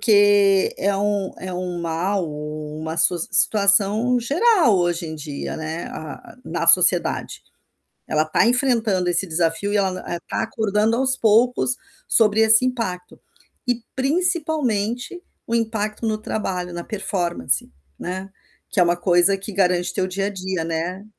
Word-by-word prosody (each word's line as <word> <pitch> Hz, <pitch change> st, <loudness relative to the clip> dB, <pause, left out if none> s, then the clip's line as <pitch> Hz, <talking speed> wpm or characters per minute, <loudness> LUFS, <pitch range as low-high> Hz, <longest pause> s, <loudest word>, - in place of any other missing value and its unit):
que 205 Hz, -2 st, +4 dB
é 200 Hz, +1 st, 0 dB
um 200 Hz, -1 st, -1 dB
é 185 Hz, 0 st, -6 dB
um 180 Hz, -1 st, -4 dB
mal 175 Hz, +3 st, -1 dB
ou 150 Hz, 0 st, -7 dB
uma 160 Hz, +1 st, -5 dB
soc 170 Hz, +1 st, +2 dB
situação 210 Hz, +4 st, +3 dB
geral 325 Hz, -, +3 dB
hoje 175 Hz, 0 st, -1 dB
em 160 Hz, -, -6 dB
dia, 150 Hz, -2 st, -6 dB
né, 160 Hz, +2 st, -5 dB
a 155 Hz, -1 st, -9 dB
a -, -, -22 dB
na -, -, -3 dB
sociedade. -, -, +4 dB, 0.7 s
Ela 155 Hz, 0 st, +1 dB
tá 155 Hz, +8 st, +2 dB
enfrentando 230 Hz, -7 st, +1 dB
esse 175 Hz, +2 st, +1 dB
desafio 165 Hz, +4 st, -1 dB
e -, -, +3 dB
ela 195 Hz, -1 st, +2 dB, 0.2 s
n 175 Hz, -, -3 dB
tá -, -, -2 dB
acordando 220 Hz, 0 st, 0 dB
aos 260 Hz, +1 st, +1 dB
poucos 245 Hz, +3 st, +2 dB, 0.3 s
sobre 215 Hz, -2 st, +3 dB
esse 220 Hz, +2 st, +5 dB
impacto. 205 Hz, -8 st, -4 dB, 0.5 s
E, 245 Hz, -1 st, 0 dB
principalmente, 280 Hz, -, -1 dB, 0.3 s
o 230 Hz, -, -1 dB
impacto 220 Hz, -1 st, -2 dB
no 215 Hz, -1 st, 0 dB
trabalho, 185 Hz, -5 st, -4 dB
na 170 Hz, 0 st, -5 dB
performance, 175 Hz, -, -2 dB, 0.3 s
né, 185 Hz, +2 st, -5 dB, 0.4 s
que -, -, -1 dB
é -, -, +7 dB
uma 175 Hz, 0 st, +1 dB
coisa 175 Hz, +2 st, +3 dB
que 195 Hz, +2 st, -8 dB
garante 180 Hz, -2 st, +1 dB
teu 185 Hz, -, -1 dB
dia 195 Hz, +1 st, -3 dB
a -, -, -2 dB
dia, 190 Hz, -3 st, -4 dB
né. 170 Hz, +4 st, -4 dB
195 Hz, 155 wpm, -21 LUFS, 175-225 Hz, 0.7 s, é